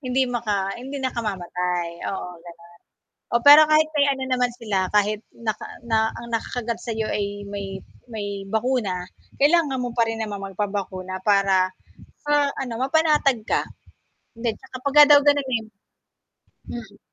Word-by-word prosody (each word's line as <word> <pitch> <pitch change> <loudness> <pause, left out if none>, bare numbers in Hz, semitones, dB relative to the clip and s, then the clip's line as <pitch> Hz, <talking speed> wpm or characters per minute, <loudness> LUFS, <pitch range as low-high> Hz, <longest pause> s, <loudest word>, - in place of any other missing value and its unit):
Hindi 260 -1 +1
maka 205 -5 -1
hindi 270 +3 -6
nakamamatay, 180 -7 -2 0.2
oo, 190 -2 -4
gano'n. 170 0 -14 0.6
Oh, 235 - +3
pero 295 +2 +10
kahit 310 0 +4
may 285 -1 +4
ano 265 -1 -4
naman 250 -1 +2
sila, 200 -6 -1
kahit 210 0 +2 0.2
naka 220 -2 -3 0.2
na 220 -1 +2
ang 235 0 -8
nakakagat 235 0 -3
sa'yo 225 -2 -3
ay 205 0 -3
may 195 -1 -6 0.3
may 205 -3 -5
bakuna, 220 -5 -1 0.4
kailangan 290 -3 +3
mo 245 -1 -3
pa 230 - +4
rin 225 - -2
naman 205 -2 -4
magpabakuna 195 -2 -4
para 195 -2 +3 0.6
sa 295 -1 +3
ano 245 -4 -4
mapanatag 290 -3 +2
ka. - - +1 0.7
Hindi, 230 -1 -2
tsaka 260 -1 -10
pagka 295 +1 +8
daw - - +9
ganunin 265 -6 +1 1.0
Mm. 220 -4 -9
225 Hz, 140 wpm, -23 LUFS, 200-260 Hz, 1.0 s, pero